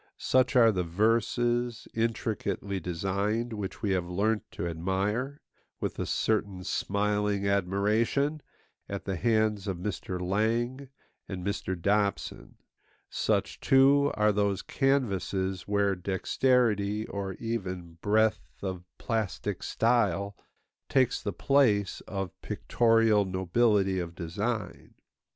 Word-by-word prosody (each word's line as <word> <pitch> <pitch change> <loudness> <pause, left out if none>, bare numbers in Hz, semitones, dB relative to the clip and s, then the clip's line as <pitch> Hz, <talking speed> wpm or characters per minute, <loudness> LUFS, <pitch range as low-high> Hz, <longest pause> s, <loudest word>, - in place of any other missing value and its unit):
Such 130 -1 +2
are 115 -3 +7
the 90 -3 -1
verses, 115 +5 +1
intricately 110 -3 -2
designed, 100 +7 -1
which 105 -1 -6
we 100 - +1
have 90 -2 0
learnt 105 +4 +1
to 85 - -3
admire, 100 - -2 0.4
with - - -3
a - - -2
certain 100 -4 0
smiling 105 0 0
admiration, 105 - +1 0.5
at 100 -1 -5
the 95 - -2
hands 110 0 +1
of 95 -3 -2
Mr. 90 0 -4
Lang 115 +8 -1 0.4
and 90 -3 -5
Mr. 95 -2 -2
Dobson; 100 +2 -1 0.6
such, - - 0
too, 140 +2 +5
are 105 0 +3
those 100 -1 0
canvases 95 -9 0
where 100 -1 +2
dexterity 105 +2 +1
or 100 -2 -4
even 90 -7 -5
breadth 110 +1 +3 0.2
of 95 -2 -4
plastic 110 -6 -2
style 110 -4 +1 0.5
takes 130 -3 +2
the 100 - -2
place 105 -3 +2
of 95 -2 -3
pictorial 115 0 +3
nobility 95 +1 +2
of 85 -1 -5
design. 105 +7 -4
105 Hz, 110 wpm, -29 LUFS, 95-115 Hz, 0.6 s, are